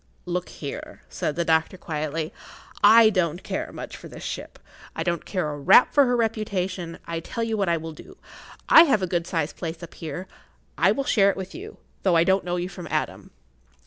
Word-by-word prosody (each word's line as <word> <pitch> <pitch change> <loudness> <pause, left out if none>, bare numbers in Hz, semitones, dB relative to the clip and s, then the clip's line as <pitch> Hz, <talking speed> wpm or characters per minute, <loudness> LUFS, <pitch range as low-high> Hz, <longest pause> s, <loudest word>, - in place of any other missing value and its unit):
"Look 180 0 -3
here," 145 - -8
said 150 - -3
the 170 0 -1
doctor, 160 +2 +2
quietly, 155 -1 -4 0.5
"I 220 +1 +8
don't 175 -3 0
care - - -4
much - - -8
for - - -10
this - - -10
ship. - - -6 0.4
I - - -2
don't 170 -2 -2
care 180 -6 -1
a 145 - -6
rap 190 - +6
for 285 -1 +6
her 245 -1 +1
reputation. 190 -6 -2
I 165 0 -3
tell 230 +8 -4
you 225 -1 -1
what 200 -4 0
I 170 - +2
will 160 0 -6
do. 380 - -14 0.5
I 325 - +9
have 215 - +2
a - - +3
good 175 -1 -2
sized 160 -4 -2
place 165 0 -5
up 170 - -9
here. 165 +3 -6 0.5
I - - +4
will 275 - -1
share 200 -7 +4
it - - -2
with 190 -1 -6
you,[Pg 415 +5 -9
27] - - -33
though 185 -3 +3
I 165 - +5
don't 190 +2 +2
know 175 0 -2
you 175 0 -2
from 180 -2 -9
Adam." - - -3
180 Hz, 215 wpm, -24 LUFS, 165-205 Hz, 0.5 s, I